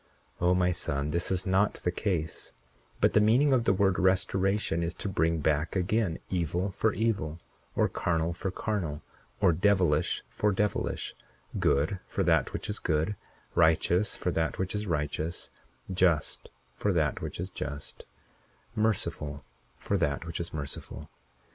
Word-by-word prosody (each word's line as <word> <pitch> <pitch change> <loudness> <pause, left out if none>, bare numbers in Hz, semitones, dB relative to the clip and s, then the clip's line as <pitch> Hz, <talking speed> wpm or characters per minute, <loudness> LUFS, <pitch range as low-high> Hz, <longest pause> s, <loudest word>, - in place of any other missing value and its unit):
41:13 90 - +2
O, 90 - +5
my 90 0 +3
son, 70 -3 -1
this 85 +2 +1
is 95 -1 0
not 95 +2 +2
the 90 - -1
case; 85 -5 -2 0.5
but - - +3
the 105 - +5
meaning 125 +7 +4
of 120 -3 +2
the - - +4
word 95 -1 +2
restoration 95 -1 +2
is 85 +1 -2
to - - -4
bring 85 -3 +1
back 75 +3 +1
again 95 -1 +1
evil 90 +2 0
for 110 +4 +1
evil, 100 -8 -1 0.4
or - - +3
carnal 85 -1 0
for 95 - -3
carnal, 90 -7 -3 0.4
or 95 -4 +6
devilish 90 -4 +2
for 105 - 0
devilish—good 75 -4 -1
for - - -1
that - - +3
which - - -4
is 105 - -3
good; 80 +6 0 0.4
righteous 85 +4 +3
for 90 - -1
that 80 -1 -1
which 95 -1 -2
is 105 0 -2
righteous; 80 0 -2 0.4
just 90 -5 +1 0.2
for 100 +11 0
that 80 -5 +1
which - - -5
is 90 +2 -4
just; 70 -4 -6 0.7
merciful 75 - -1 0.3
for - - -1
that 70 +3 0
which 85 0 -4
is 85 - -4
merciful. 70 -2 -6
90 Hz, 155 wpm, -29 LUFS, 80-100 Hz, 0.7 s, or